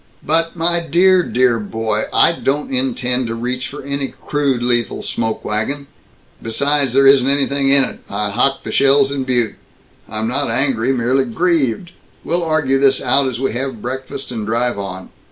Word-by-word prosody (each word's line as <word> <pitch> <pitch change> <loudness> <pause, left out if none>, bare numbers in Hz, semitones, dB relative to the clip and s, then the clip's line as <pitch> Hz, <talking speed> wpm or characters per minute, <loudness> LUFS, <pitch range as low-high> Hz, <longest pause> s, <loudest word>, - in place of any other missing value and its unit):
"But, 165 +2 +2
my 170 +1 +1
dear, 180 +3 +3
dear 125 -6 +1
boy, 110 0 -2
I - - +5
don't 145 -3 -2
intend 125 -1 0
to 115 - -4
reach 125 +2 -3
for 145 - -9
any 140 0 -3 0.2
crude 140 -5 0
lethal 120 -1 -1
smoke 115 -1 -3
wagon. 135 +7 -2 0.6
Besides, 140 +3 0
there 135 0 +5
isn't 135 -1 +5
anything 140 0 +1
in 140 0 +6
it. - - -5
I 105 -1 -2
hocked 135 +6 +1
the - - -5
shells 140 0 +3
in 135 -2 -3
Butte. 120 -4 0 0.5
I 110 - -4
am 110 +1 -1
not 135 +2 0
angry, 130 0 +1
merely 130 +1 +1
grieved. 165 +2 -1 0.3
We'll 175 +1 -1
argue 150 -4 +1
this 135 -1 +3
out 135 +2 +2
as 125 -2 -4
we 135 -3 -1
have 125 -3 -4
breakfast 130 +1 -6
and 115 -3 -4
drive 115 +1 -1
on. 95 -1 -7
130 Hz, 175 wpm, -17 LUFS, 120-140 Hz, 0.6 s, in